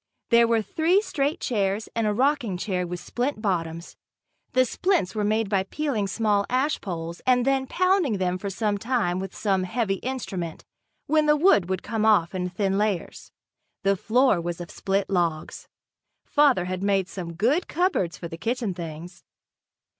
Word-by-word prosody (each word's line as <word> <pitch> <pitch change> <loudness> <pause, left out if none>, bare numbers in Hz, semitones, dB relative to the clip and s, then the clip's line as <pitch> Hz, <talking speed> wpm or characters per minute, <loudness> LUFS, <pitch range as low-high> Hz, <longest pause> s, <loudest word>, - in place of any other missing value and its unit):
There 235 0 +6
were 230 -1 +2
three 325 - +2
straight 295 -7 -1
chairs 205 -2 -1
and 230 -2 +1
a - - +2
rocking 255 -6 +1
chair 180 -1 -2
with 175 0 -5
splint 250 +7 -3
bottoms. 170 -5 -3 0.6
The 255 0 +4
splints 305 - 0
were 215 -2 -1
made 215 +1 +1
by 195 -1 +1
peeling 220 0 -2
small 205 0 +1
ash 265 +4 0
poles 170 -3 -5
and 250 -1 +4
then 270 -1 +1
pounding 365 - +2
them 185 -1 -1
for 200 - -4
some 205 +1 -1
time 220 -6 0
with 190 0 -6
some 195 -3 +1
heavy 195 +1 -1
instrument, 190 -10 -5 0.4
when 310 +1 +2
the 300 - +5
wood 290 - +4
would 190 -1 -2
come 225 -2 -2
off 200 -6 +4
in 180 -1 -2
thin 195 +1 0
layers. 210 -4 -2 0.5
The 195 0 +3
floor 220 0 +2
was 175 0 -4
of 175 - -7
split 195 0 -1
logs. 170 -4 -2 0.6
Father 280 -11 +3
had 185 0 -3
made 195 -2 +1
some 175 -4 -6
good 255 - +1
cupboards 325 - 0
for 170 - -6
the 165 0 -9
kitchen 225 +1 -1
things. 170 +1 -8
205 Hz, 170 wpm, -25 LUFS, 180-250 Hz, 0.6 s, There